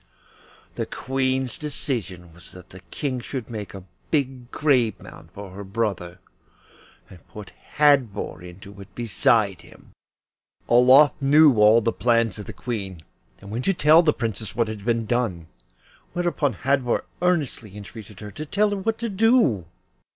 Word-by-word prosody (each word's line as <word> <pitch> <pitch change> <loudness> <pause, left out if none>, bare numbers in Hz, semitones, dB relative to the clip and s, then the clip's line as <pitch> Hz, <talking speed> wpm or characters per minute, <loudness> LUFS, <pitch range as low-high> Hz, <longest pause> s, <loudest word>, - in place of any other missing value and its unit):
The - - -2
Queen's 130 -1 -2
decision 105 - -5
was 85 +1 -15
that 90 -1 -14
the 95 - -11
King 130 - -3
should 120 -1 -7
make 105 -4 -7
a 95 - -9 0.3
big 130 -5 -2
grave 130 -8 +1
mound 80 - -13
for 100 0 -10
her 100 +2 -8
brother, 95 -4 -3 0.9
and 90 - -15
put 105 -2 -11 0.3
Hadvor 140 -12 +2
into 95 +3 -12
it 95 -1 -15
beside 110 -5 +1
him. 85 - -18 0.8
Olof 130 +4 +6
knew 145 +1 +6
all 105 +2 +6
the 115 +1 0
plans 115 -4 +1
of 105 - -7
the - - -6
Queen, 95 -9 -6 0.4
and 100 0 -11
went 120 +4 -4
to 195 - +2
tell 155 +1 +6
the 160 -3 +3
Princess 110 -5 -4
what 115 -1 +1
had 110 -2 -7
been 115 0 0
done, 110 -8 -1 0.7
whereupon 170 -6 0
Hadvor 130 +1 0 0.2
earnestly 145 - -1
entreated 105 -1 -11
her 105 -1 -8
to 155 - -7
tell 205 +5 +1
her 205 - -1
what 220 +3 -2
to 235 - -3
do. 215 - +2
115 Hz, 155 wpm, -23 LUFS, 100-140 Hz, 0.9 s, Olof